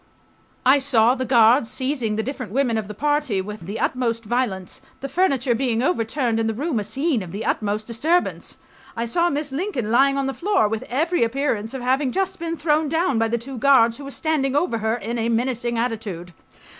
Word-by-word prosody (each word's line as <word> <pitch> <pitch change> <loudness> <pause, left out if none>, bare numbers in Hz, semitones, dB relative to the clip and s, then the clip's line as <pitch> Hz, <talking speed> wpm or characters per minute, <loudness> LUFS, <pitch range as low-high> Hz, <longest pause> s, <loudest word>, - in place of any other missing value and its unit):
I... 270 +3 +6
saw 245 -4 +4
the 260 0 -3
guards 230 0 +5
seizing 255 -4 -1
the 220 - -1
different 255 -5 -5
women 250 -1 +1
of 220 -2 -2
the 210 - -8
party 290 -6 0
with 195 -2 -7
the 205 +3 -4
utmost 230 -3 -1
violence, 205 -6 -2 0.2
the 275 - -4
furniture 275 -7 +1
being 240 -1 0
overturned 235 -4 0
and 225 0 0
the 220 - -3
room 285 -1 -1
a - - -2
scene 260 - -1
of 180 -3 -8
the 205 +4 -5
utmost 210 0 -1
disturbance. 310 +10 -1 0.4
I 230 - -1
saw 340 +9 +1
Miss 290 -2 -2
Lincoln 270 - -2
lying 275 +3 +4
on 275 - 0
the 270 - -2
floor, 390 - +1
with 220 +1 -3
every 320 +5 +1
appearance 230 -2 -1
of 255 - -5
having 260 +1 +1
just 380 +2 -1
been 335 0 -3
thrown 305 -1 +1
down 325 -5 +1
by 225 - +2
the 235 +1 0
two 250 +2 -7
guards 235 -3 +4
who - - -8
were 275 - -7
standing 280 -2 -1
over 290 -7 +1
her 220 +1 0
in 235 0 -4
a 230 +1 0
menacing 240 0 -1
attitude. 215 -7 -3
250 Hz, 205 wpm, -22 LUFS, 225-280 Hz, 0.4 s, I